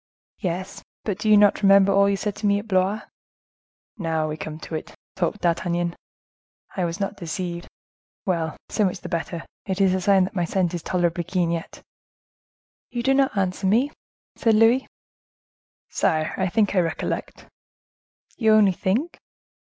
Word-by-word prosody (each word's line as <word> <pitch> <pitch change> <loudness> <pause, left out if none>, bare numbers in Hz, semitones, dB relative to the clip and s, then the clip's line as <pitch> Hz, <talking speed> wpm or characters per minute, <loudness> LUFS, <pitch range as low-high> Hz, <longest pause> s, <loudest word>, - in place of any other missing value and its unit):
"Yes; 185 0 -4 0.2
but 205 -2 -3
do 215 - 0
you 210 - +7
not 205 0 +4
remember 195 -1 +6
all 200 0 +4
you 200 - +1
said 205 0 -3
to 210 - -1
me 200 0 +3
at 205 +2 -6
Blois?" 190 +2 +1 1.0
"Now 160 -3 0
we 155 - -3
come 155 0 -6
to - - -9
it," 155 - -5 0.2
thought 210 - -1
D'Artagnan; 175 0 0 0.8
"I 185 - 0
was 170 +3 -4
not 200 0 -3
deceived. 175 0 -5 0.6
Well, 165 -4 -1
so 215 - 0
much 185 -1 -1
the 180 - -7
better, 170 0 -3 0.2
it 190 0 -2
is 190 -2 +4
a 185 - 0
sign 195 0 +4
that 190 - -3
my 180 -4 0
scent 180 0 0
is 175 - -3
tolerably 175 0 0
keen 175 -1 0
yet." 165 -1 -5 1.1
"You 240 -1 -3
do 270 +2 +3
not 270 -5 +2
answer 190 0 0
me," 240 +9 +3 0.5
said 225 -2 +3
Louis. 230 +4 +4 1.0
"Sire, 155 0 +1
I 190 -1 0
think 210 0 +2
I 190 - +3
recollect." 165 -2 -3 0.9
"You 220 -2 +4
only 210 -3 +6
think?" 220 - -1
190 Hz, 170 wpm, -24 LUFS, 175-205 Hz, 1.1 s, you